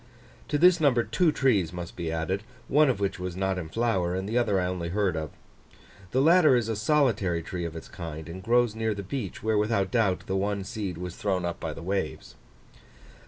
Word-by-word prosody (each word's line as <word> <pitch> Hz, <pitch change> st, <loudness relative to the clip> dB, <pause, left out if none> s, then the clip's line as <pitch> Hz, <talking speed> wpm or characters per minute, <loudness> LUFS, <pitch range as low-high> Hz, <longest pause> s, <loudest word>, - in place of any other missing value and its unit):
To -, -, 0 dB
this 175 Hz, +2 st, +5 dB
number 125 Hz, -6 st, +4 dB
two 175 Hz, +4 st, +2 dB
trees 110 Hz, -, +2 dB
must 90 Hz, -1 st, -7 dB
be 85 Hz, -2 st, -3 dB
added; 80 Hz, +5 st, -1 dB, 0.3 s
one 150 Hz, +1 st, +4 dB
of 125 Hz, -, 0 dB
which 100 Hz, -1 st, -1 dB
was 90 Hz, -1 st, -4 dB
not 95 Hz, 0 st, -1 dB
in 80 Hz, -3 st, -6 dB
flower, 95 Hz, -4 st, 0 dB
and 95 Hz, +1 st, -3 dB
the 110 Hz, -, -3 dB
other 110 Hz, -5 st, +2 dB
I 90 Hz, -, 0 dB
only 90 Hz, -2 st, -3 dB
heard 95 Hz, -1 st, 0 dB
of. 80 Hz, -1 st, -3 dB, 0.8 s
The 130 Hz, +5 st, +2 dB
latter 165 Hz, -3 st, +6 dB
is 120 Hz, -3 st, +1 dB
a 110 Hz, -, 0 dB
solitary 110 Hz, -, +1 dB
tree 90 Hz, 0 st, -4 dB
of 85 Hz, -1 st, -6 dB
its 80 Hz, -, -8 dB
kind, 80 Hz, -5 st, -7 dB
and 90 Hz, +3 st, -7 dB
grows 120 Hz, +2 st, +2 dB
near 110 Hz, -1 st, -1 dB
the 100 Hz, -, -5 dB
beach, 100 Hz, -2 st, -5 dB
where, 110 Hz, -1 st, +2 dB
without 105 Hz, -3 st, 0 dB
doubt, 100 Hz, -6 st, +1 dB
the 95 Hz, -, -2 dB
one 100 Hz, 0 st, -1 dB
seed 100 Hz, -4 st, -4 dB
was 90 Hz, 0 st, -6 dB
thrown 95 Hz, -3 st, -1 dB
up 85 Hz, -, -3 dB
by 80 Hz, -, -4 dB
the 85 Hz, -, -9 dB
waves. 95 Hz, +2 st, -3 dB
100 Hz, 215 wpm, -27 LUFS, 90-115 Hz, 0.8 s, latter